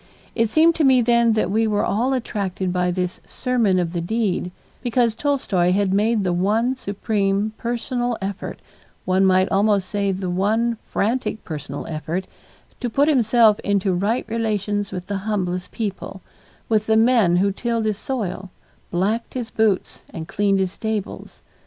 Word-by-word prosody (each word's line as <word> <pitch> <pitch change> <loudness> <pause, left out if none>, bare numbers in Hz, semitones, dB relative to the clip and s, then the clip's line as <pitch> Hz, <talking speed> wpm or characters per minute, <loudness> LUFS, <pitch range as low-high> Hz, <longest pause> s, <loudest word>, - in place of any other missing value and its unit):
It 230 -1 +1
seemed 325 +6 +5
to 320 - +2
me 260 -3 +5
then 235 -1 +4
that 215 -4 0
we 225 +2 +2
were 210 -1 +1
all 245 +6 +1
attracted 195 -7 -2
by 180 0 +1
this 180 0 -2
sermon 235 -7 +1
of 175 -2 -1
the 170 - -1
deed, 195 -1 -1 0.3
because 240 -2 +1
Tolstoy 220 -10 +1
had 195 -1 +1
made 215 +1 +2
the 180 -2 0
one 215 +8 +1
supreme 200 -2 -1
personal 240 0 -2
effort, 195 0 -5 0.4
one 185 +1 +2
might 185 0 +4
almost 200 -1 +2
say 200 -1 0
the 190 0 -3
one 220 +5 +1
frantic 225 0 -1
personal 145 -3 -6
effort, 165 +4 -3 0.5
to 245 - -2
put 280 +6 +2
himself 230 -5 +4
into 200 -2 0
right 205 +7 0
relations 210 -3 -1
with 180 -1 -5
the 200 -1 -3
humblest 180 -3 -2
people, 195 -3 -5 0.4
with 215 -1 +1
the 220 0 +4
men 225 -6 +4
who 195 +3 +2
tilled 230 +2 -2
his 215 -1 -1
soil, 195 -7 -4 0.4
blacked 205 +9 -1
his 245 -3 -4
boots, 215 -4 0
and 160 0 -7
cleaned 200 0 +1
his 190 -1 0
stables. 220 -1 -5
205 Hz, 160 wpm, -22 LUFS, 190-230 Hz, 0.5 s, seemed